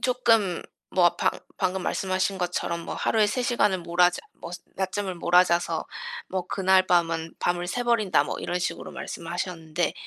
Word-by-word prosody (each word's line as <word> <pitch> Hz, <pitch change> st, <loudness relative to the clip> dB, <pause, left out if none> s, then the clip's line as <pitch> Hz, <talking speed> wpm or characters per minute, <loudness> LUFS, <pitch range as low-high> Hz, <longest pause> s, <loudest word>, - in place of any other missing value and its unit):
...쪼끔 225 Hz, -8 st, +2 dB, 0.3 s
뭐 175 Hz, -2 st, +4 dB
방 -, -, +2 dB, 0.3 s
방금 185 Hz, 0 st, 0 dB
말씀하신 190 Hz, +1 st, -1 dB
것처럼 175 Hz, -1 st, -2 dB
뭐 -, -, -5 dB
"하루에 220 Hz, -2 st, +2 dB
3 245 Hz, +5 st, -1 dB
시간을 210 Hz, -6 st, +2 dB
몰아 175 Hz, +1 st, +4 dB
자 180 Hz, -, -6 dB, 0.2 s
뭐스 175 Hz, +1 st, -7 dB, 0.2 s
낮잠을 190 Hz, 0 st, -2 dB
몰아자서 170 Hz, -1 st, +3 dB, 0.4 s
뭐 185 Hz, -1 st, -3 dB
그날 190 Hz, -1 st, +3 dB
밤은 165 Hz, -2 st, +1 dB
밤을 175 Hz, 0 st, 0 dB
새버린다." 230 Hz, -1 st, +2 dB
뭐 -, -, -4 dB
이런 180 Hz, -, -2 dB
식으로 180 Hz, -, -3 dB
말씀하셨는데 170 Hz, -1 st, -3 dB
180 Hz, 330 characters per minute, -26 LUFS, 175-195 Hz, 0.4 s, 뭐